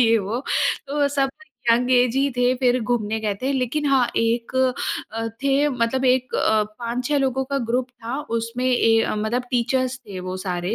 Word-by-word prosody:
ये 230 -1 +5
वो। 215 +5 -3 0.5
तो 285 0 +1
सब 275 -1 0 0.4
यंग 245 +2 +3
ऐज 250 0 +3
ही 275 +1 +2
थे, 245 +1 +3
फिर 250 -1 +2
घूमने 220 -1 -1
गए 210 -2 -1
थे। 270 +1 0
लेकिन 265 +3 -1
हाँ, 265 -3 +4
एक 230 +2 0 0.6
अ, 225 0 -3 0.2
थे 280 +2 +3
मतलब 255 0 0
एक 255 0 +2
अ, 215 -1 +3 0.2
5-6 245 +4 -1
लोगों 265 -1 0
का 275 +1 -2
ग्रुप 250 +1 +1
था 245 +3 -5 0.2
उसमें 230 +2 -3
ए, 230 -3 +4
अ, - - -1
मतलब 220 +4 -1
टीचर्स 255 +1 0
थे 190 -3 -6
वो 185 0 -3
सारे, 180 +2 -2
245 Hz, 185 wpm, -22 LUFS, 230-265 Hz, 0.6 s, ये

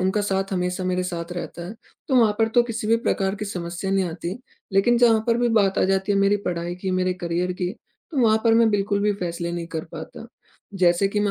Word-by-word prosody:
उनका 190 +3 +1
साथ 195 -1 -1
हमेशा 180 0 -1
मेरे 185 0 0
साथ 170 0 -5
रहता 175 -1 -6
है। 195 - -7 0.3
तो 265 - +3
वहाँ 225 -4 +5
पर 225 0 +3
तो 240 - +6
किसी 230 -2 -4
भी 225 +1 +4
प्रकार 195 -1 +1
की 210 +1 -5
समस्या 175 -1 -4
नहीं 195 -1 +2
आती। 170 +4 -5 0.3
लेकिन 215 +5 +3
जहाँ 230 -2 +5
पर 230 -1 +3
भी 240 0 +2
बात 205 -4 +2
आ - - +3
जाती 195 +1 +1
है 200 - +2
मेरी 200 +1 +3
पढ़ाई 175 0 -2
की, 185 +1 -4
मेरे 185 0 +1
करियर 175 +1 -1
की, 180 0 -3 0.4
तो 300 - -3
वहाँ 220 -2 +5
पर 225 -1 +5
मैं 230 0 +5
बिल्कुल 200 0 0
भी 210 0 +2
फैसले 170 0 -3
नहीं 170 -1 -4
कर 160 - -3
पाता। - - -8 0.5
जैसे 175 +1 +4
कि 205 +1 -1
मैं 205 -1 +1
195 Hz, 240 wpm, -23 LUFS, 180-210 Hz, 0.5 s, तो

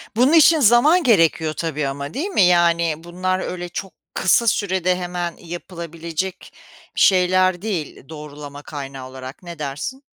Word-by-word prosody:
Bunun 255 +7 +3
için 320 0 +6
zaman 280 - +5
gerekiyor 165 - +3
tabii 150 -4 -3
ama, 140 +2 -5
değil 325 +9 -2
mi? 385 - +1
Yani, 170 -2 +3
bunlar 185 +2 -2
öyle 175 -1 -5
çok 190 +2 -6 0.2
kısa 230 +5 +2
sürede 185 -4 +1
hemen 175 -1 -4
yapılabilecek 170 +1 -6 0.4
bir - - -1
şeyler 185 -1 +3
değil, 170 -9 -5
doğrulama 145 -2 -9
kaynağı 135 -3 -8
olarak. 130 +5 -10
Ne 170 -2 -9
dersin? 150 - -5
175 Hz, 140 wpm, -20 LUFS, 155-190 Hz, 0.4 s, için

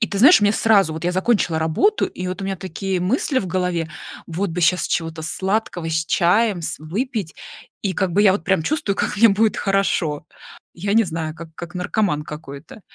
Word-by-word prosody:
И 220 - +2
ты 200 - -4
знаешь, 280 - +7
у - - +2
меня 205 +1 +3
сразу 200 -8 +3
вот, 160 - -6
я 180 - +1
закончила 185 -4 +1
работу 160 - +1
и 185 - -6
вот 185 +2 -4
у - - -4
меня 195 -1 -2
такие 190 +1 -3
мысли 260 - +1
в 195 - -3
голове: 180 -2 -1 0.4
вот 180 +4 -2
бы 170 +2 -3
сейчас 180 +3 +3
чего-то 165 -1 -2
сладкого 190 0 -2
с 160 0 -1
чаем 185 +1 +2
с - - -3
выпить. 200 - -4 0.5
И 195 - 0
как 190 -2 -1
бы 205 - +3
я 200 -3 +6
вот 190 - -2
прям 190 -3 +1
чувствую, 205 - -1
как - - -1
мне 230 - +7
будет 215 +2 +2
хорошо. 185 -6 0 0.5
Я 200 +4 -2
не 225 0 +5
знаю, 160 -3 -4
как 165 0 -10
как 175 +2 -9
наркоман 180 -3 -1
какой-то. 150 +5 -10
185 Hz, 210 wpm, -21 LUFS, 165-205 Hz, 0.5 s, знаешь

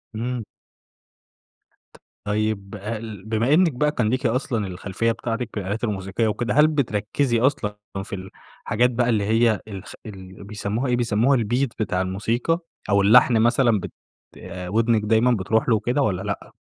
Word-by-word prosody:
إمم. 120 +1 -3 1.5
ت - - -17 0.3
طيب 105 -1 -1
ال 105 -1 -6
بما 115 +5 +1
إنِك 170 +1 +4
بقى 150 +4 +1
كان 120 -7 0
ليكِ 130 +3 -1
أصلًا 115 -3 0
الخلفية 95 +5 -2
بتاعتِك 115 +1 -3
بالآلات 105 +2 -4
الموسيقية 100 0 -1
وكده. 110 +1 -1
هل 150 +1 +6
بتركزي 120 -3 0
أصلًا 115 -5 0 0.3
في 95 -1 -7 0.4
الحاجات 120 +4 +2
بقى 120 0 +1
اللي 110 -4 +2
هي 110 0 +2
الس 100 -2 -8
ال 95 -2 -10
بيسموها 105 +5 -3
إيه 125 - +2
بيسموها 120 +3 +2
الbeat 120 +5 +1
بتاع 95 -4 0
الموسيقى 115 - -1 0.3
أو 100 -1 +4
اللحن 115 +3 +6
مثلًا 120 -1 +3
بت - - -7 0.8
ودنِك 115 +3 +2
دايمًا 110 +4 +3
بتروح 110 +2 +1
له 115 - +5
وكده 120 +6 0
والّا 95 -8 0
لأ؟ 100 0 -5
110 Hz, 150 wpm, -23 LUFS, 105-120 Hz, 1.5 s, هل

